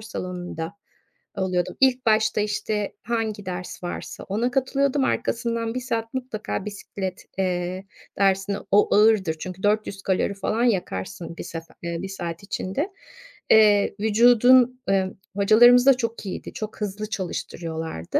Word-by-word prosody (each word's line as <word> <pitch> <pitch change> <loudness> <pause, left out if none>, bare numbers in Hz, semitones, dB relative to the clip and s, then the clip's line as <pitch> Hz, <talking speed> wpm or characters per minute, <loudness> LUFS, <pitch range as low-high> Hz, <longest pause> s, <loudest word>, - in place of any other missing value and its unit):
salonunda 180 -4 -6 0.6
oluyordum. 185 -1 -1
İlk 255 -2 +3
başta, 220 -1 +3
işte, 210 0 -2
hangi 220 -3 -2
ders 180 0 -6
varsa 175 - -6
ona 225 +6 -1
katılıyordum. 275 +1 +1
Arkasından 230 -1 -1
1 255 - 0
saat 230 -2 -3
mutlaka 250 -6 -4
bisiklet, 200 -2 -6
eee, 185 0 -2 0.3
dersine 195 0 +2
O 205 0 +4
ağırdır 210 -6 +4
çünkü 185 +3 -7
400 205 -1 0
kalori 195 +1 0
falan 215 +4 -1
yakarsın 170 - -2
bir - - -5
sefe 165 0 -8
eee, 170 0 -3
1 195 - -5
saat 175 -2 -5
içinde. 200 - -3 0.6
Eee, 210 -2 +5
vücudun, 245 +3 +5
ııı, 190 -1 +1 0.2
hocalarımız 240 +5 +6
da 275 - +8
çok 230 -3 -4
iyiydi, 190 - -6
çok 215 0 -7
hızlı 210 +1 -3
çalıştırıyorlardı. 165 - -3
205 Hz, 130 wpm, -24 LUFS, 185-230 Hz, 0.6 s, da